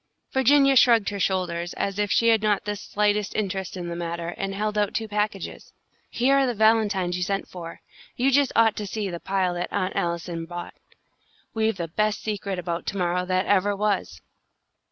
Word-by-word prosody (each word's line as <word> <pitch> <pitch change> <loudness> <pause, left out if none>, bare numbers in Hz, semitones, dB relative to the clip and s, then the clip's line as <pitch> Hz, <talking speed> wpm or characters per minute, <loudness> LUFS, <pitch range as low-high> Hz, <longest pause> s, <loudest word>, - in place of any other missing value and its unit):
Virginia 275 +1 +5
shrugged 230 -4 +5
her 200 -1 -5
shoulders, 175 -2 -1
as 200 0 -3
if 205 0 +1
she 230 - +4
had 225 -2 +4
not 210 -2 +1
the 210 0 -2
slightest 210 0 -1
interest 190 -3 -3
in 175 -1 -5
the 170 - -4
matter, 170 0 -4
and 195 +2 -4
held 210 +1 -2
out 210 0 0
two 225 - -1
packages. 210 -2 -3 0.4
"Here 270 +3 +3
are 270 - +2
the 245 - -1
valentines 205 -5 +2
you - - -4
sent 195 +2 -1
for. 170 -2 -9 0.3
You 265 +3 +2
just 280 0 +3
ought 225 -1 +4
to 210 - -4
see 205 -1 -3
the 170 - -5
pile 190 -1 0
that 175 0 -4
Aunt 185 +1 -1
Allison 170 -1 -2
bought. 175 0 -7 0.8
We've 220 -2 0
the 170 -2 -3
best 210 +5 -1
secret 200 -3 -3
about 170 -1 -4
to 200 - -2
morrow 180 0 0
that 185 +1 +1
ever 205 0 +2
was." 195 - -1
200 Hz, 195 wpm, -25 LUFS, 180-215 Hz, 0.8 s, Virginia